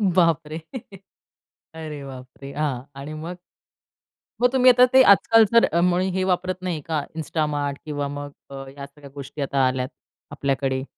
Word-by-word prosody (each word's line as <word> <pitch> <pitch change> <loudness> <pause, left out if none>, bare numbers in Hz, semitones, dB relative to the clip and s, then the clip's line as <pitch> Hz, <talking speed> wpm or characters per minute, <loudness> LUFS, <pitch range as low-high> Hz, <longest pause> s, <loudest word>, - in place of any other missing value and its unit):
बापरे! 165 -3 +2 1.2
अरे 155 -3 -7
बापरे! 130 +1 -10
हां. 140 -4 -2 0.2
आणि 145 +2 -7
मग? 165 +3 -6 1.1
मग 245 - +6
तुम्ही 255 -1 +6
आता 250 +1 +6
ते 260 - +8
आजकाल 225 +1 +6
जर 230 - +5
मुळे 180 +1 +2
हे 185 +1 -1
वापरत 185 0 0
नाही 175 -4 -3
का 160 -2 0 0.2
Instamart 150 -2 -2
किंवा 145 -2 -3
मग 145 0 -6 0.5
या 140 - -6
सगळ्या 140 0 -15
गोष्टी 140 +1 -7
आता 135 -1 +1
आल्यात 130 0 -2 0.4
आपल्याकडे? 135 -1 -1
150 Hz, 140 wpm, -23 LUFS, 140-180 Hz, 1.2 s, ते